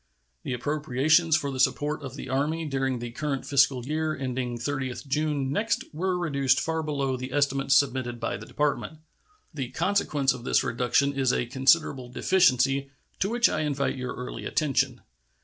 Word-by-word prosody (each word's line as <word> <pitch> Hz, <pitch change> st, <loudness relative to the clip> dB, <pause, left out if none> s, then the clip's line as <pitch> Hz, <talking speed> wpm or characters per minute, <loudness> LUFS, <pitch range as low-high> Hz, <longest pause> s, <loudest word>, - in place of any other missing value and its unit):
The -, -, -4 dB
appropriations 150 Hz, +4 st, +2 dB
for 140 Hz, -2 st, -3 dB
the 130 Hz, -, -5 dB
support 150 Hz, +3 st, +1 dB
of 135 Hz, -2 st, -7 dB
the -, -, -7 dB
Army 150 Hz, +5 st, -1 dB
during 135 Hz, -2 st, -1 dB
the 120 Hz, 0 st, -6 dB
current 135 Hz, +1 st, -3 dB
fiscal 135 Hz, -3 st, +3 dB
year 155 Hz, +2 st, -1 dB
ending 125 Hz, -2 st, -3 dB
30th 130 Hz, +2 st, -3 dB
June 145 Hz, -1 st, -1 dB
next 220 Hz, +10 st, 0 dB
were 180 Hz, +3 st, -1 dB
reduced 140 Hz, -6 st, +2 dB
far 160 Hz, 0 st, -1 dB
below 140 Hz, -4 st, -1 dB
the 130 Hz, +1 st, -6 dB
estimate 140 Hz, -1 st, 0 dB
submitted 130 Hz, -3 st, +2 dB
by 115 Hz, -, -2 dB
the -, -, -11 dB
Department. 150 Hz, +1 st, -1 dB, 0.6 s
The 135 Hz, -5 st, -4 dB
consequence 160 Hz, -6 st, +1 dB
of 125 Hz, -2 st, -9 dB
this -, -, +2 dB
reduction 125 Hz, +4 st, +1 dB
is 135 Hz, -2 st, +1 dB
a 120 Hz, -, 0 dB
considerable 130 Hz, 0 st, +2 dB
deficiency, 135 Hz, -3 st, +2 dB, 0.3 s
to 195 Hz, -, +1 dB
which 235 Hz, +1 st, +4 dB
I -, -, -1 dB
invite 145 Hz, -2 st, -1 dB
your 125 Hz, -1 st, -5 dB
early 125 Hz, 0 st, -6 dB
attention. 150 Hz, -4 st, 0 dB
140 Hz, 165 wpm, -26 LUFS, 130-155 Hz, 0.6 s, which